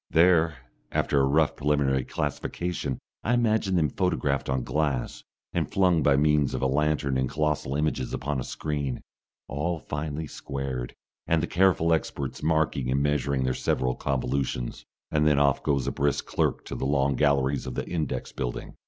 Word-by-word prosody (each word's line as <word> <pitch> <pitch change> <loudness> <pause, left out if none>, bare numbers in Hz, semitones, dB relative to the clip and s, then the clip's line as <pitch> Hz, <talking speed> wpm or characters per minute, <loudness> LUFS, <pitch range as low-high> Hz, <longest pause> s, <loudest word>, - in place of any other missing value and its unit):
There, 85 -1 +4 0.4
after 70 - +1
a 70 - +4
rough 75 +2 +3
preliminary 70 -2 +1
classification, 75 +1 -3 0.3
I 120 - +2
imagine 110 -5 +2
them 80 -4 +3
photographed 70 -8 0
on 65 -2 0
glass, 70 -4 -1 0.3
and - - -1
flung 90 -4 +3
by 70 -1 +4
means 75 -1 +3
of - - -2
a - - +3
lantern 70 -1 +1
in 65 - +1
colossal 75 -2 -1
images 75 -4 -1
upon 70 0 -2
a - - -2
screen, 70 -4 -3 0.5
all 80 +5 -2
finely 75 0 -4
squared, 70 -4 -5 0.3
and 80 -1 +2
the - - +3
careful 85 -2 +3
experts 70 -4 -2
marking 80 -5 +1
and 70 +2 +2
measuring 70 -2 +1
their 65 0 +1
several 65 0 0
convolutions. 65 -2 -2 0.3
And 75 0 +3
then 75 -2 +4
off 70 -1 +3
goes 70 -4 +1
a - - 0
brisk 70 +1 0
clerk - - -1
to - - -6
the 65 - -2
long 70 -1 +2
galleries 70 -1 +2
of 65 - -5
the - - -3
index 80 -6 -3
building. - - -5
70 Hz, 170 wpm, -27 LUFS, 65-80 Hz, 0.5 s, There